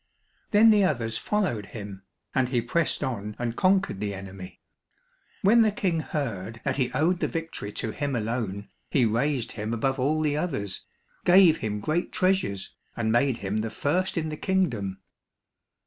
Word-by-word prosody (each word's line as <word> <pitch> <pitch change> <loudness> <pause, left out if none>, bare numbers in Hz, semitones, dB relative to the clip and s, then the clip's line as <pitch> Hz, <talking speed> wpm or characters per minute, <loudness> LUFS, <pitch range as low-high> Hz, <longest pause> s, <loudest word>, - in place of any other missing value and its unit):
Then 220 +2 +7
the 210 -2 +5
others 115 -9 0
followed 180 - -1
him, 100 -2 -7 0.3
and 130 -2 +2
he 125 -2 +1
pressed 150 +8 0
on 105 -6 -3
and 120 -1 -2
conquered 190 - +2
the 100 -1 -2
enemy. 95 -1 -9 0.8
When 225 +4 +6
the 220 -1 +4
King 185 -5 0
heard 115 -8 -4
that 140 -1 -1
he 130 -3 0
owed 175 +3 +2
the - - +1
victory 165 -11 -4
to 110 - -3
him 140 +3 -2
alone, 110 -3 -3 0.2
he 130 -4 +3
raised 120 +3 0
him 110 +1 -3
above 135 +4 0
all 150 +4 +1
the 150 -2 +1
others, 125 - -3 0.4
gave 175 -3 +7
him 105 -2 -3
great 155 +9 -1
treasures, 185 - 0 0.2
and 110 -2 0
made 120 +1 +2
him 100 +2 -1
the 110 +1 -1
first 180 +10 -1
in 160 -1 -1
the 155 - -5
kingdom. 120 - 0
130 Hz, 165 wpm, -26 LUFS, 105-165 Hz, 0.8 s, Then